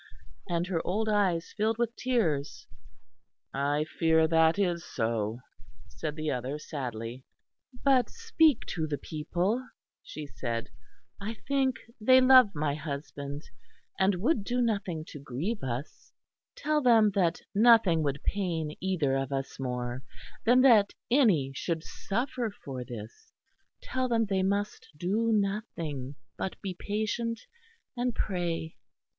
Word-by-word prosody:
And 170 Hz, 0 st, 0 dB
her 175 Hz, -3 st, -1 dB
old 215 Hz, +4 st, -1 dB
eyes 195 Hz, -5 st, +1 dB
filled 220 Hz, +1 st, +1 dB
with 235 Hz, 0 st, -1 dB
tears. 165 Hz, -, -1 dB, 0.9 s
"I 145 Hz, +2 st, +1 dB
fear 160 Hz, 0 st, +2 dB
that 160 Hz, +2 st, +4 dB
is 175 Hz, -4 st, 0 dB
so," 110 Hz, 0 st, -2 dB, 0.5 s
said 150 Hz, +5 st, -5 dB
the 155 Hz, -1 st, -2 dB
other 130 Hz, +2 st, -3 dB
sadly. 125 Hz, -5 st, -5 dB, 0.6 s
"But 260 Hz, -4 st, +4 dB
speak 325 Hz, -, +2 dB
to 160 Hz, -2 st, -2 dB
the 145 Hz, -1 st, -2 dB
people," 175 Hz, -, -1 dB, 0.4 s
she 155 Hz, -, -8 dB
said, 115 Hz, -4 st, -4 dB, 0.5 s
"I 215 Hz, +3 st, -4 dB
think 270 Hz, -2 st, +2 dB, 0.3 s
they 255 Hz, +3 st, +7 dB
love 255 Hz, -6 st, +7 dB
my 145 Hz, -1 st, 0 dB
husband, 145 Hz, -1 st, -5 dB, 0.6 s
and 190 Hz, 0 st, +3 dB
would 220 Hz, -, +1 dB
do 245 Hz, +4 st, -1 dB
nothing 200 Hz, -9 st, -1 dB
to 145 Hz, -, -8 dB
grieve 150 Hz, -, -3 dB
us; 130 Hz, +3 st, -5 dB, 0.4 s
tell 305 Hz, -11 st, +1 dB
them 225 Hz, -5 st, +5 dB
that 175 Hz, -3 st, +1 dB
nothing 215 Hz, -6 st, +6 dB
would 140 Hz, -2 st, -2 dB
pain 165 Hz, -6 st, -1 dB
either 165 Hz, -8 st, +1 dB
of 135 Hz, 0 st, -2 dB
us 135 Hz, -1 st, -3 dB
more 125 Hz, -1 st, -3 dB, 0.4 s
than 245 Hz, +2 st, +6 dB
that 225 Hz, -6 st, +6 dB, 0.2 s
any 200 Hz, -, +4 dB
should 165 Hz, +3 st, -2 dB
suffer 240 Hz, +4 st, -3 dB
for 130 Hz, -3 st, -4 dB
this. 120 Hz, -, -10 dB, 0.5 s
Tell 260 Hz, 0 st, -1 dB
them 230 Hz, -2 st, +2 dB
they 195 Hz, -2 st, 0 dB
must 200 Hz, +2 st, -1 dB
do 210 Hz, +8 st, +1 dB
nothing, 175 Hz, -, -2 dB, 0.2 s
but 190 Hz, -, -3 dB
be 190 Hz, -2 st, -3 dB
patient 220 Hz, +4 st, -2 dB, 0.6 s
and 245 Hz, -1 st, -1 dB
pray." 170 Hz, -4 st, -2 dB
180 Hz, 130 wpm, -29 LUFS, 145-225 Hz, 0.9 s, they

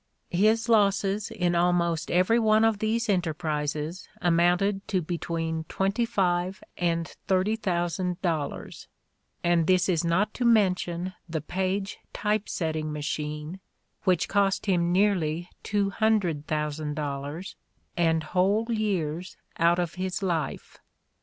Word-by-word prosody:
His 220 Hz, +5 st, +3 dB
losses 200 Hz, -2 st, +2 dB
in 175 Hz, -2 st, 0 dB
almost 170 Hz, -2 st, +1 dB
every 185 Hz, +7 st, +3 dB
one 220 Hz, -1 st, +4 dB
of 225 Hz, -2 st, +2 dB
these 230 Hz, +2 st, 0 dB
enterprises 155 Hz, -2 st, -2 dB
amounted 180 Hz, +4 st, +2 dB
to 190 Hz, -, +1 dB
between 165 Hz, -1 st, -3 dB
twenty 195 Hz, +8 st, 0 dB
five 185 Hz, -3 st, 0 dB
and 170 Hz, -2 st, 0 dB, 0.2 s
thirty 190 Hz, +3 st, +2 dB
thousand 180 Hz, -3 st, -1 dB
dollars, 160 Hz, -5 st, -3 dB, 0.6 s
and 170 Hz, -2 st, +3 dB
this 185 Hz, -1 st, +4 dB
is 175 Hz, -3 st, +1 dB
not 180 Hz, +6 st, +1 dB
to 250 Hz, -, -3 dB
mention 185 Hz, -5 st, +2 dB, 0.2 s
the 160 Hz, -1 st, -1 dB
Paige 190 Hz, +5 st, -2 dB
Typesetting 165 Hz, -7 st, -1 dB
Machine, 150 Hz, +3 st, -4 dB, 0.4 s
which 185 Hz, -4 st, +2 dB
cost 200 Hz, -1 st, +1 dB
him 175 Hz, -3 st, +2 dB
nearly 175 Hz, -4 st, +1 dB
two 205 Hz, -1 st, 0 dB
hundred 195 Hz, -9 st, +1 dB
thousand 150 Hz, -1 st, -2 dB
dollars 145 Hz, +5 st, -4 dB, 0.4 s
and 165 Hz, -2 st, +2 dB
whole 195 Hz, +7 st, +2 dB
years 185 Hz, -6 st, -2 dB, 0.2 s
out 170 Hz, +1 st, +4 dB
of 175 Hz, -2 st, -1 dB
his 190 Hz, +1 st, -2 dB
life. 170 Hz, -4 st, -3 dB
180 Hz, 120 wpm, -27 LUFS, 165-200 Hz, 0.6 s, one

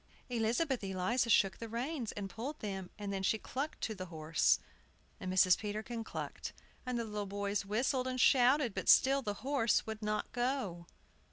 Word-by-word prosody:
Elizabeth 240 Hz, +3 st, 0 dB
Eliza 195 Hz, +6 st, 0 dB
shook 195 Hz, -4 st, +4 dB
the 230 Hz, -, -6 dB
reins, 245 Hz, +1 st, -3 dB
and 200 Hz, -1 st, -4 dB
pulled 250 Hz, +10 st, -5 dB
them, 195 Hz, -3 st, -4 dB
and 205 Hz, -1 st, -4 dB
then 195 Hz, -, -2 dB
she 190 Hz, +3 st, +2 dB
clucked 275 Hz, +7 st, -4 dB
to 220 Hz, -, -1 dB
the 185 Hz, -3 st, -7 dB
horse; 160 Hz, -1 st, +2 dB, 0.6 s
and 185 Hz, -, -4 dB
Mrs. 185 Hz, -1 st, +5 dB
Peterkin 220 Hz, +2 st, -4 dB
clucked; -, -, -6 dB, 0.3 s
and 250 Hz, -1 st, -1 dB
the 230 Hz, -, -1 dB
little 210 Hz, -2 st, -4 dB
boys 200 Hz, +1 st, -2 dB
whistled 255 Hz, +5 st, +1 dB
and 255 Hz, 0 st, -2 dB
shouted; 255 Hz, -1 st, +5 dB
but -, -, -2 dB
still 275 Hz, +1 st, +6 dB
the 205 Hz, -5 st, -3 dB
horse 265 Hz, -5 st, +2 dB
would 220 Hz, 0 st, -5 dB
not 210 Hz, 0 st, -2 dB
go. 240 Hz, -9 st, -2 dB
220 Hz, 175 wpm, -34 LUFS, 195-250 Hz, 0.6 s, still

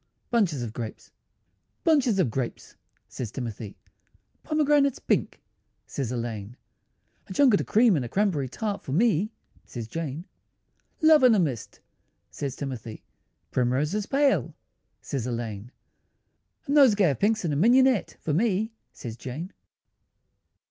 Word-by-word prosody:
BUNCHES 180 Hz, -, +1 dB
OF 110 Hz, -2 st, -5 dB
GRAPES 115 Hz, -2 st, -7 dB, 0.7 s
"Bunches 280 Hz, -, +3 dB
of 165 Hz, -12 st, +2 dB
grapes," 125 Hz, 0 st, -4 dB, 0.3 s
says 120 Hz, -4 st, -6 dB
Timothy; 110 Hz, -3 st, -6 dB, 0.6 s
"Pomegranates 295 Hz, -3 st, +2 dB
pink," -, -, -1 dB, 0.4 s
says 130 Hz, -4 st, -4 dB
Elaine; 115 Hz, -2 st, -5 dB, 0.7 s
"A -, -, -7 dB
junket 250 Hz, -4 st, +4 dB
of -, -, -6 dB
cream 225 Hz, -2 st, +4 dB
and 140 Hz, -, 0 dB
a 120 Hz, -, -6 dB
cranberry 180 Hz, -, 0 dB
tart 205 Hz, -, -3 dB
For 135 Hz, -, -6 dB
me," 210 Hz, +2 st, +2 dB, 0.3 s
says 115 Hz, -3 st, -7 dB
Jane. 160 Hz, +3 st, -5 dB, 0.8 s
"Love 315 Hz, -2 st, +7 dB
in 250 Hz, -3 st, +6 dB
a -, -, +3 dB
mist," 135 Hz, -, -3 dB, 0.5 s
says 140 Hz, -3 st, -4 dB
Timothy; 125 Hz, -6 st, -6 dB, 0.5 s
"Primroses 145 Hz, +12 st, 0 dB
pale," 275 Hz, 0 st, +1 dB, 0.5 s
says 130 Hz, -4 st, -4 dB
Elaine; 115 Hz, -2 st, -5 dB, 1.0 s
"A -, -, -2 dB
nosegay 215 Hz, -, +5 dB
of 135 Hz, -, -5 dB
pinks 215 Hz, -1 st, +1 dB
and 150 Hz, -3 st, 0 dB
mignonette 250 Hz, +1 st, +4 dB
For 155 Hz, -, -2 dB
me," 215 Hz, +4 st, +1 dB, 0.2 s
says 115 Hz, -3 st, -7 dB
Jane. 145 Hz, -, -7 dB
165 Hz, 130 wpm, -26 LUFS, -, 1.0 s, Love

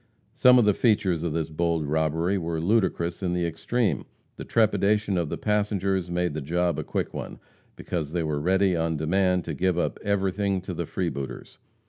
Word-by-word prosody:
Some 125 Hz, 0 st, +6 dB
of 120 Hz, -, +5 dB
the 105 Hz, -, +4 dB
features 100 Hz, -7 st, +2 dB
of 85 Hz, -3 st, -2 dB
this 80 Hz, -1 st, -2 dB
bold 85 Hz, 0 st, 0 dB
robbery 80 Hz, +5 st, 0 dB
were 85 Hz, -1 st, -3 dB
ludicrous 90 Hz, -2 st, 0 dB
in 90 Hz, -2 st, -1 dB
the 90 Hz, -1 st, 0 dB
extreme. 85 Hz, -, -1 dB, 0.3 s
The -, -, -7 dB
trepidation 105 Hz, -2 st, +2 dB
of 85 Hz, -4 st, 0 dB
the -, -, -3 dB
passengers 100 Hz, -3 st, 0 dB
made 90 Hz, -2 st, -1 dB
the 80 Hz, -, -4 dB
job 85 Hz, +4 st, 0 dB
a -, -, -2 dB
quick -, -, -3 dB
one, -, -, -6 dB, 0.4 s
because 80 Hz, -5 st, -4 dB
they 85 Hz, 0 st, -1 dB
were 75 Hz, -2 st, -1 dB
ready 95 Hz, +2 st, +2 dB
on 80 Hz, -1 st, 0 dB
demand 90 Hz, +3 st, +1 dB
to 80 Hz, -, -3 dB
give 90 Hz, +3 st, 0 dB
up 85 Hz, -, -1 dB
everything 100 Hz, -1 st, 0 dB
to 95 Hz, 0 st, -6 dB
the 85 Hz, -1 st, -4 dB
freebooters. 70 Hz, -8 st, -5 dB
90 Hz, 185 wpm, -26 LUFS, 80-100 Hz, 0.4 s, Some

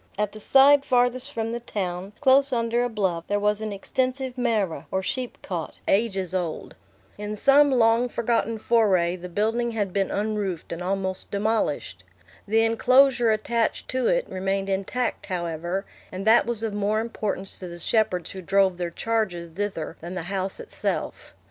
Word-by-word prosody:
At 210 Hz, 0 st, 0 dB
the 215 Hz, -, -10 dB
side 275 Hz, +5 st, +6 dB
farthest 250 Hz, +1 st, +1 dB
from 225 Hz, -3 st, -3 dB
the 235 Hz, -, -3 dB
town, 190 Hz, -4 st, -4 dB
close 275 Hz, 0 st, +5 dB
under 235 Hz, 0 st, +1 dB
a 245 Hz, -, -1 dB
bluff, 190 Hz, -7 st, -1 dB
there 205 Hz, 0 st, 0 dB
was 210 Hz, +1 st, +1 dB
an 215 Hz, -1 st, -3 dB
extensive 255 Hz, +5 st, -2 dB
marah, 215 Hz, -, -1 dB
or 190 Hz, 0 st, -1 dB
sheepcot, 190 Hz, -7 st, -4 dB
ages 195 Hz, -4 st, +1 dB
old. 175 Hz, -4 st, -3 dB, 0.4 s
In 210 Hz, 0 st, -4 dB
some 280 Hz, +6 st, +5 dB
long 240 Hz, -1 st, +3 dB
forgotten 230 Hz, -1 st, 0 dB
foray, 200 Hz, -7 st, +2 dB
the 180 Hz, 0 st, -8 dB
building 225 Hz, +5 st, 0 dB
had 205 Hz, -4 st, -2 dB
been 195 Hz, -1 st, +1 dB
unroofed 205 Hz, -5 st, -2 dB
and 170 Hz, +1 st, -5 dB
almost 190 Hz, 0 st, -2 dB
demolished. 200 Hz, -, -1 dB, 0.4 s
The 225 Hz, +2 st, +3 dB
enclosure 245 Hz, +1 st, +4 dB
attached 225 Hz, +1 st, 0 dB
to 255 Hz, -1 st, 0 dB
it -, -, +1 dB
remained 195 Hz, +1 st, -2 dB
intact, 195 Hz, +6 st, -2 dB
however, 175 Hz, +1 st, -3 dB, 0.3 s
and 190 Hz, +2 st, -5 dB
that 225 Hz, +1 st, +5 dB
was 230 Hz, -2 st, -2 dB
of 220 Hz, -2 st, -2 dB
more 205 Hz, +1 st, 0 dB
importance 215 Hz, -4 st, -3 dB
to 185 Hz, -, -6 dB
the 175 Hz, 0 st, -8 dB
shepherds 180 Hz, -1 st, 0 dB
who 190 Hz, -, -7 dB
drove 190 Hz, 0 st, +2 dB
their 175 Hz, -1 st, -2 dB
charges 185 Hz, -3 st, -2 dB
thither 170 Hz, -3 st, -4 dB
than 175 Hz, +3 st, -6 dB
the 180 Hz, -, -3 dB
house 190 Hz, 0 st, -2 dB
itself. -, -, -4 dB
210 Hz, 165 wpm, -25 LUFS, 185-235 Hz, 0.4 s, side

